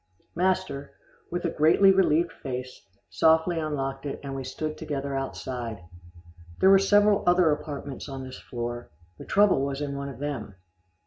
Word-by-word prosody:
Master, 180 -6 -1 0.3
with 175 +1 -3
a 170 - 0
greatly 165 +6 +5
relieved 170 -3 +3
face, 130 -2 -7 0.2
softly 160 +1 +3
unlocked 135 -3 -3
it, 140 - -5
and 135 -1 -5
we 135 - -4
stood 155 +3 -4
together 140 -1 -4
outside. 125 -6 -5 0.8
There 190 - +6
were 195 - +8
several 205 +1 +4
other 175 -2 +5
apartments 145 -2 -5
on 135 -1 -6
this 130 0 -9
floor 120 0 -5 0.3
the - - -9
trouble 200 -9 +3
was 140 0 -2
in 145 -1 -3
one 140 0 -4
of 135 - -9
them. 130 -8 -5
145 Hz, 155 wpm, -26 LUFS, 135-175 Hz, 0.8 s, were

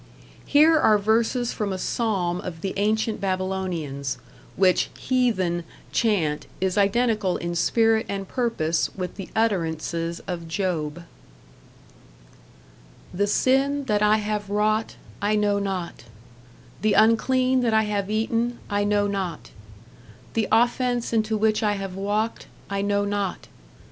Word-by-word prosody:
Here 310 +2 +5
are 215 -6 +5
verses 230 +4 +1
from 210 -3 -2
a 190 - -2
psalm 185 -5 -1
of 165 -3 -7
the 195 - -3
ancient 215 +2 0
Babylonians, 185 -8 -2 0.4
which 185 -1 +3
"heathen" 200 -10 0 0.3
chant 175 -10 0
is 190 0 0
identical 210 -1 +2
in 170 0 -4
spirit 225 +6 +2
and 195 -1 -4
purpose 175 -11 0
with 180 -1 -4
the 195 - -7
utterances 170 -5 -1
of 175 -3 -5
Job: 165 -3 -2 2.1
The 205 +3 +1
Sin 270 +6 +2
that 210 -4 +1
I 210 +1 +4
have 210 -1 -3
wrought, 215 +2 0 0.3
I 205 +1 +2
know 205 -1 +2
not; 190 -3 -4 0.8
The 215 -1 +2
unclean 255 +4 +3
that 230 -3 +1
I 220 - +4
have 205 -2 -2
eaten, 230 +2 0
I 205 0 +1
know 205 0 +2
not; 190 -5 -4 0.8
The 225 -2 0
offense 240 +1 +2
into 220 -1 +1
which 215 0 +2
I 210 -1 +2
have 195 -2 -5
walked, 205 +4 -2 0.2
I 200 0 -1
know 205 0 +1
not.... 200 -2 -2
205 Hz, 130 wpm, -24 LUFS, 185-225 Hz, 2.1 s, Here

